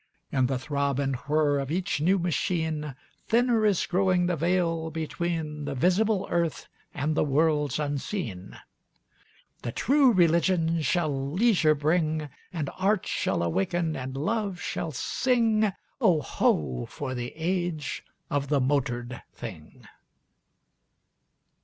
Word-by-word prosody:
In 130 Hz, -2 st, +2 dB
the 130 Hz, 0 st, -1 dB
throb 140 Hz, 0 st, -1 dB
and 135 Hz, -1 st, 0 dB
whir 150 Hz, -1 st, +2 dB
of 135 Hz, -1 st, -3 dB
each 175 Hz, -2 st, -1 dB
new 185 Hz, +5 st, +3 dB
machine 160 Hz, -4 st, -1 dB, 0.3 s
Thinner 230 Hz, -2 st, +3 dB
is 200 Hz, -4 st, +2 dB
growing 185 Hz, -1 st, +2 dB
the 175 Hz, 0 st, +1 dB
veil 165 Hz, 0 st, 0 dB
between 160 Hz, -1 st, -3 dB
The 140 Hz, -1 st, -3 dB
visible 190 Hz, -, +2 dB
earth 170 Hz, -2 st, -1 dB, 0.2 s
and 150 Hz, +2 st, -1 dB
the -, -, +2 dB
worlds 150 Hz, -1 st, +2 dB
unseen. 140 Hz, -, -4 dB, 1.0 s
The 120 Hz, -, -4 dB
True 270 Hz, -, +4 dB
Religion 170 Hz, -2 st, +3 dB
shall 145 Hz, -3 st, 0 dB
leisure 180 Hz, -7 st, +4 dB
bring; 155 Hz, 0 st, 0 dB, 0.2 s
And 155 Hz, -6 st, -3 dB
Art 200 Hz, +1 st, +2 dB
shall -, -, 0 dB
awaken 155 Hz, -, 0 dB
and 130 Hz, 0 st, -5 dB
Love 200 Hz, +4 st, -1 dB
shall 165 Hz, -, -3 dB
sing: 220 Hz, -, +1 dB, 0.3 s
Oh, 180 Hz, -9 st, +4 dB
ho! 65 Hz, -, 0 dB
for 130 Hz, -3 st, -5 dB
the 120 Hz, -1 st, -4 dB
age 170 Hz, -3 st, -2 dB, 0.2 s
of 140 Hz, -1 st, -1 dB
the 145 Hz, 0 st, +2 dB
motored 125 Hz, -3 st, -1 dB
thing! 90 Hz, -10 st, -10 dB
155 Hz, 125 wpm, -27 LUFS, 140-180 Hz, 1.0 s, True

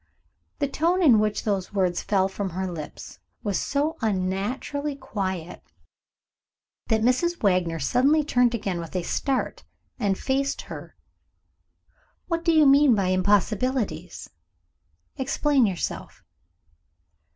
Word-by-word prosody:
The 285 Hz, -, 0 dB
tone 340 Hz, +6 st, +1 dB
in 245 Hz, -9 st, +6 dB
which 210 Hz, 0 st, 0 dB
those 200 Hz, -2 st, -2 dB
words 180 Hz, -3 st, +1 dB
fell 190 Hz, -2 st, +1 dB
from 195 Hz, 0 st, -4 dB
her 185 Hz, +2 st, -3 dB
lips 170 Hz, -5 st, -8 dB, 0.2 s
was 200 Hz, -3 st, 0 dB
so 290 Hz, +3 st, -1 dB
unnaturally 220 Hz, +9 st, -2 dB
quiet, 190 Hz, -, -4 dB, 1.3 s
that 220 Hz, -2 st, +1 dB
Mrs. 300 Hz, +8 st, +1 dB
Wagner 180 Hz, -4 st, +2 dB
suddenly 265 Hz, -, +2 dB
turned 245 Hz, -4 st, +2 dB
again 195 Hz, -5 st, -3 dB
with 165 Hz, +1 st, -8 dB
a 180 Hz, -, 0 dB
start, 270 Hz, +8 st, -2 dB, 0.4 s
and 195 Hz, -2 st, +1 dB
faced 275 Hz, +1 st, -1 dB
her. -, -, -9 dB, 1.3 s
"What 335 Hz, -1 st, -2 dB
do 335 Hz, -, +3 dB
you 310 Hz, -2 st, +5 dB
mean 275 Hz, -2 st, +6 dB
by 195 Hz, -3 st, 0 dB
impossibilities? 205 Hz, +1 st, 0 dB, 0.9 s
Explain 275 Hz, -1 st, +2 dB
yourself." 185 Hz, -4 st, -5 dB
215 Hz, 120 wpm, -25 LUFS, 190-275 Hz, 1.3 s, in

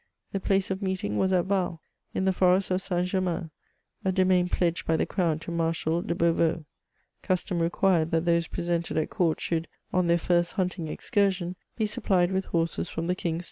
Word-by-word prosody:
The 195 Hz, -, -1 dB
place 195 Hz, 0 st, +1 dB
of 190 Hz, +1 st, -2 dB
meeting 185 Hz, -, -1 dB
was 190 Hz, -, +2 dB
at 180 Hz, -2 st, +2 dB
Val, 185 Hz, -4 st, 0 dB, 0.4 s
in 190 Hz, -, 0 dB
the 190 Hz, -, +3 dB
forest 185 Hz, +1 st, +3 dB
of 185 Hz, +1 st, +1 dB
St. 180 Hz, -2 st, -1 dB
Germain, 180 Hz, -3 st, -1 dB, 0.5 s
a 190 Hz, -, +2 dB
domain 185 Hz, -1 st, +3 dB
pledged 170 Hz, -2 st, 0 dB
by 160 Hz, -, +3 dB
the -, -, +1 dB
Crown 170 Hz, -5 st, 0 dB
to 170 Hz, -, -7 dB
Marshal 165 Hz, 0 st, 0 dB
de 190 Hz, -2 st, -2 dB
Beauveau. 165 Hz, -1 st, +1 dB, 0.6 s
Custom 185 Hz, -2 st, -1 dB
required, 170 Hz, -1 st, +2 dB
that 165 Hz, 0 st, +1 dB
those 170 Hz, -1 st, +2 dB
pre -, -, -4 dB
sented 170 Hz, -2 st, 0 dB
at 155 Hz, -, -2 dB
court 175 Hz, -6 st, +1 dB
should, 165 Hz, -1 st, -1 dB, 0.3 s
on 180 Hz, -1 st, +2 dB
their 170 Hz, 0 st, +4 dB
first 175 Hz, 0 st, +1 dB
hunting 180 Hz, -3 st, -2 dB
excursion, 185 Hz, +1 st, 0 dB, 0.2 s
be 220 Hz, -, +1 dB
supplied 190 Hz, -3 st, +1 dB
with 190 Hz, 0 st, 0 dB
horses 165 Hz, -1 st, -1 dB
from 165 Hz, -, -3 dB
the 180 Hz, -, +1 dB
King's 170 Hz, -3 st, -2 dB
stables. -, -, -3 dB
175 Hz, 200 wpm, -27 LUFS, 165-190 Hz, 0.6 s, their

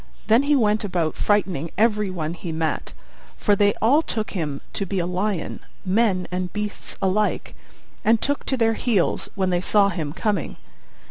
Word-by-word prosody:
Then 225 Hz, +3 st, +5 dB
he 290 Hz, +1 st, +3 dB
went 215 Hz, -4 st, +2 dB
about 175 Hz, -5 st, 0 dB
frightening 185 Hz, -7 st, 0 dB
every 210 Hz, -2 st, +2 dB
one 165 Hz, -3 st, -3 dB
he 175 Hz, 0 st, -6 dB
met, 160 Hz, 0 st, -2 dB, 0.4 s
for 205 Hz, -, +3 dB
they 205 Hz, 0 st, +3 dB
all 275 Hz, +8 st, +5 dB
took 220 Hz, -8 st, -2 dB
him 150 Hz, -7 st, -3 dB
to 200 Hz, -, -2 dB
be 195 Hz, -, -2 dB
a 175 Hz, -, +1 dB
lion, 185 Hz, 0 st, -2 dB, 0.3 s
men 190 Hz, -2 st, +2 dB
and 180 Hz, 0 st, -2 dB
beasts 210 Hz, -1 st, -5 dB
alike, 205 Hz, +2 st, 0 dB, 0.5 s
and 225 Hz, +1 st, +4 dB
took 285 Hz, +4 st, -1 dB
to 265 Hz, -, 0 dB
their 225 Hz, -1 st, +3 dB
heels 220 Hz, -5 st, 0 dB
when 190 Hz, -2 st, 0 dB
they 175 Hz, 0 st, +1 dB
saw 200 Hz, +1 st, +4 dB
him 160 Hz, -7 st, -3 dB
coming. 195 Hz, 0 st, -1 dB
200 Hz, 175 wpm, -23 LUFS, 180-215 Hz, 0.5 s, Then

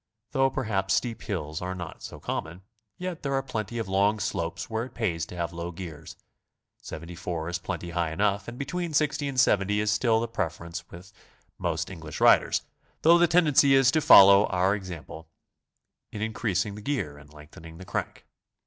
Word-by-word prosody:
Though 135 Hz, 0 st, +3 dB
per 130 Hz, 0 st, -3 dB
haps 95 Hz, -4 st, 0 dB
steep 115 Hz, -2 st, -2 dB
hills 80 Hz, -6 st, -4 dB
are 90 Hz, +1 st, -4 dB
not 90 Hz, -2 st, -8 dB
so -, -, -9 dB
common, 85 Hz, +4 st, -5 dB, 0.3 s
yet 180 Hz, -2 st, -5 dB
there 140 Hz, -1 st, -1 dB
are 135 Hz, -, 0 dB
plenty 120 Hz, -3 st, -4 dB
of 115 Hz, -3 st, -3 dB
long 100 Hz, +3 st, +2 dB
slopes 85 Hz, -2 st, -3 dB
where 110 Hz, 0 st, -2 dB
it 130 Hz, -, -14 dB
pays 85 Hz, -8 st, -1 dB
to -, -, -10 dB
have 85 Hz, -1 st, -3 dB
low 85 Hz, +1 st, -5 dB
gears; 80 Hz, -3 st, -9 dB, 0.7 s
74 85 Hz, 0 st, -6 dB
is 90 Hz, 0 st, -3 dB
plenty 90 Hz, -2 st, -5 dB
high 85 Hz, -1 st, -1 dB
enough, 100 Hz, +3 st, 0 dB
and 120 Hz, +1 st, -7 dB
between 160 Hz, +4 st, -3 dB
60 150 Hz, -1 st, +1 dB
and 135 Hz, -2 st, -2 dB
70 105 Hz, -3 st, +3 dB
is 105 Hz, 0 st, +1 dB
still 110 Hz, +1 st, +2 dB
the 115 Hz, -, -2 dB
preference 85 Hz, -4 st, -5 dB
with 90 Hz, +4 st, -13 dB, 0.5 s
most -, -, -2 dB
English 80 Hz, -4 st, -8 dB
riders, -, -, +4 dB, 0.4 s
though 170 Hz, +2 st, +7 dB
the 175 Hz, -, +5 dB
tendency 150 Hz, -5 st, +5 dB
is 135 Hz, -1 st, +5 dB
to 155 Hz, 0 st, +2 dB
follow 100 Hz, -4 st, +8 dB
our 90 Hz, +2 st, +2 dB
example 85 Hz, -5 st, -7 dB, 0.8 s
in 105 Hz, -, -6 dB
increasing 105 Hz, -3 st, -1 dB
the 105 Hz, -, -9 dB
gear 100 Hz, -, -3 dB
and 75 Hz, 0 st, -17 dB
lengthening 75 Hz, +2 st, -13 dB
the 95 Hz, -, -10 dB
crank. -, -, -4 dB
100 Hz, 185 wpm, -27 LUFS, 85-120 Hz, 0.8 s, follow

